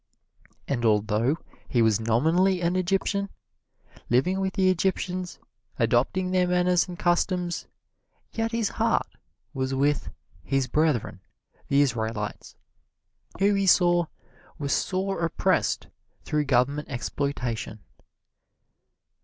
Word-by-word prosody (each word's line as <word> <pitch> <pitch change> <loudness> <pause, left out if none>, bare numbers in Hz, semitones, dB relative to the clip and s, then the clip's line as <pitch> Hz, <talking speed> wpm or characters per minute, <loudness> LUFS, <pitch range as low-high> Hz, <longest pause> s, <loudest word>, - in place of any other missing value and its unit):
And 120 -4 -1
although 110 +5 +2 0.3
he 120 -2 +3
was 110 -1 +3
nominally 160 +12 +2
an 175 +1 0
Egyptian, 195 +2 0 0.8
living 180 +11 +2
with 190 0 -1
the 190 -2 +3
Egyptians, 185 0 -1 0.4
adopting 125 +11 +1
their 180 -1 +2
manners 180 0 +2
and 180 -1 -8
customs, 175 0 0 0.6
yet 225 0 -2
his 230 -2 0
heart - - +1 0.5
was 130 0 -2
with 140 +1 +1 0.3
"his 135 +6 0
brethren," 135 -7 0 0.5
the 140 +1 +3
Israelites, 110 -5 -2 0.8
who 200 +1 +3
he 195 -1 +1
saw 175 -1 +4 0.5
were 140 -1 -4
sore 190 +3 -1
oppressed 165 - +1 0.4
through 150 -1 0
governmental 140 +3 +1
exploitation. 125 -4 -3
160 Hz, 105 wpm, -26 LUFS, 125-185 Hz, 0.8 s, saw